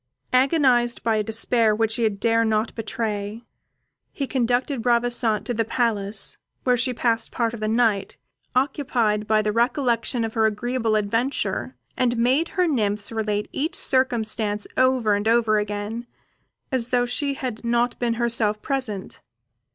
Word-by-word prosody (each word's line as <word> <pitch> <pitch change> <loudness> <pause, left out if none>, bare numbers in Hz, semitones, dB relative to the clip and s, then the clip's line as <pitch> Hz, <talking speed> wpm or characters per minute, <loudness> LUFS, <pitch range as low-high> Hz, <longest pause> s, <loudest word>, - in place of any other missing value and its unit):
Agonized 255 -3 +3
by 225 -1 +2
a 215 - +1
despair 225 0 +2
which 225 0 0
he 230 -2 +2
dared 225 +2 +1
not 220 +1 0
betray, 215 -1 -4 0.7
he 280 - -3
conducted 250 0 0
Ravissante 235 -3 +2
to 245 - -2
the 225 0 +1
Palace, 220 -3 -1 0.3
where 250 -1 +3
she 255 +2 +1
passed 230 -2 0
part 230 -2 -1
of 235 - -6
the 215 - -2
night, 220 -3 +1 0.4
occupied 250 -6 0
by 215 -1 +3
the 210 - 0
recollection 235 +1 0
of 225 -1 -3
her 220 -1 +3
agreeable 225 +1 -1
adventure, 230 +6 -1 0.2
and 245 -2 +1
made 260 +8 +2
her 365 - +4
nymphs 210 -8 0
relate 210 -2 -2
each 305 +4 -2
circumstance 220 -5 +1
over 255 -4 +3
and 205 +1 -1
over 225 -2 +3
again, 210 +3 -4 0.6
as 250 -2 +1
though 245 -1 +2
she 280 +3 -1
had 250 -5 -5
not 240 +1 0
been 235 -1 0
herself 230 -3 0
present. 245 -8 -4
230 Hz, 150 wpm, -23 LUFS, 215-245 Hz, 0.7 s, her